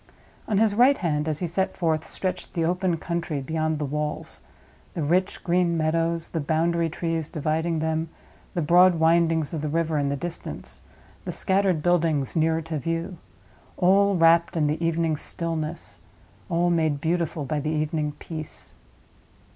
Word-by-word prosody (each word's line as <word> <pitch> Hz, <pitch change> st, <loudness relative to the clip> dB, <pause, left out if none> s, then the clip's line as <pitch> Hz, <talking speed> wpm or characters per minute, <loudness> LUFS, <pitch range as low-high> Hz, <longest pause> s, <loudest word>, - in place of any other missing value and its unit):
On 210 Hz, -, +1 dB
his 215 Hz, 0 st, +3 dB
right 250 Hz, +6 st, +5 dB
hand, 150 Hz, -3 st, -1 dB
as 155 Hz, -2 st, -1 dB
he -, -, 0 dB
set 180 Hz, +3 st, -1 dB
forth, 160 Hz, -3 st, 0 dB
stretched 185 Hz, 0 st, -4 dB
the 165 Hz, -2 st, +1 dB
open 180 Hz, 0 st, 0 dB
country 170 Hz, -3 st, -3 dB
beyond 155 Hz, +3 st, -1 dB
the 150 Hz, -, -2 dB
walls—the 150 Hz, +2 st, -6 dB
rich 180 Hz, +6 st, 0 dB
green 175 Hz, -1 st, +2 dB
meadows, 165 Hz, +1 st, 0 dB
the 165 Hz, -, -2 dB
boundary 165 Hz, +2 st, +1 dB
trees 165 Hz, -1 st, -3 dB
dividing 160 Hz, +1 st, -1 dB
them, 160 Hz, +1 st, -1 dB, 0.5 s
the 170 Hz, -, 0 dB
broad 180 Hz, +3 st, +6 dB
windings 165 Hz, -1 st, +2 dB
of 155 Hz, -, -2 dB
the 150 Hz, -, -2 dB
river 160 Hz, 0 st, 0 dB
in 140 Hz, -1 st, 0 dB
the 140 Hz, -, 0 dB
distance, 170 Hz, +4 st, -7 dB, 0.4 s
the -, -, -4 dB
scattered 190 Hz, -5 st, +1 dB
buildings 165 Hz, -6 st, +1 dB
nearer 160 Hz, 0 st, +2 dB
to 160 Hz, -1 st, -3 dB
view; 165 Hz, +3 st, -3 dB, 0.6 s
all 195 Hz, +2 st, +4 dB
wrapped 165 Hz, 0 st, +4 dB
in 155 Hz, -, +2 dB
the 150 Hz, +3 st, -1 dB
evening 165 Hz, -1 st, +1 dB
stillness, 165 Hz, 0 st, -4 dB, 0.5 s
all 175 Hz, 0 st, +2 dB
made 160 Hz, -4 st, +1 dB
beautiful 165 Hz, -1 st, -1 dB
by 150 Hz, +3 st, -1 dB
the 150 Hz, -, -2 dB
evening 155 Hz, -1 st, -1 dB
peace. 155 Hz, -1 st, -8 dB
165 Hz, 155 wpm, -25 LUFS, 155-170 Hz, 0.6 s, broad